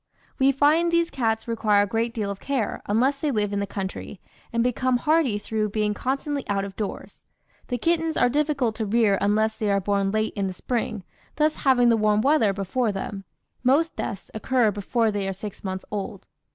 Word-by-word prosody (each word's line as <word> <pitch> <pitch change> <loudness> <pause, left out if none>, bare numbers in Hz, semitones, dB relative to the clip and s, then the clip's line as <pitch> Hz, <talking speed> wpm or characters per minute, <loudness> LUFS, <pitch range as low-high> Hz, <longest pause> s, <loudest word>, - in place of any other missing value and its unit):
"We 270 +1 +5
find 300 +5 +3
these 340 0 +2
cats 225 -3 -1
require 215 -3 +3
a - - -2
great 230 +3 -1
deal 215 -4 -3
of 200 - -7
care, 265 -6 -2
unless 255 +7 +2
they 300 - 0
live 210 -5 0
in 200 - 0
the 200 - -2
country, 195 0 -6 0.3
and 235 0 +1
become 250 +1 +1
hardy 300 -5 +2
through 215 0 -2
being 210 0 0
constantly 275 +4 -2
out 200 -1 0
of 195 -1 -9
doors. 210 -2 -6 0.4
The 245 - -2
kittens 325 +4 0
are - - +4
difficult 280 -3 +1
to 220 - -2
rear 210 -2 +3
unless 215 +2 +2
they 215 -2 -1
are 200 0 +3
born 200 0 0
late 215 +2 0
in 200 -2 -1
the 190 - -4
spring, 220 0 -3 0.3
thus 305 +1 +1
having 245 -3 +4
the 230 - +4
warm 210 -1 +3
weather 270 -6 +3
before 200 +4 -1
them. 195 0 -5 0.4
Most 290 +6 +3
deaths 200 -4 -5
occur 230 0 +2
before 220 +3 0
they 200 -2 -2
are 195 - -2
six 205 +1 -8
months 190 -1 -4
old. 200 -1 -5
220 Hz, 200 wpm, -24 LUFS, 205-260 Hz, 0.4 s, We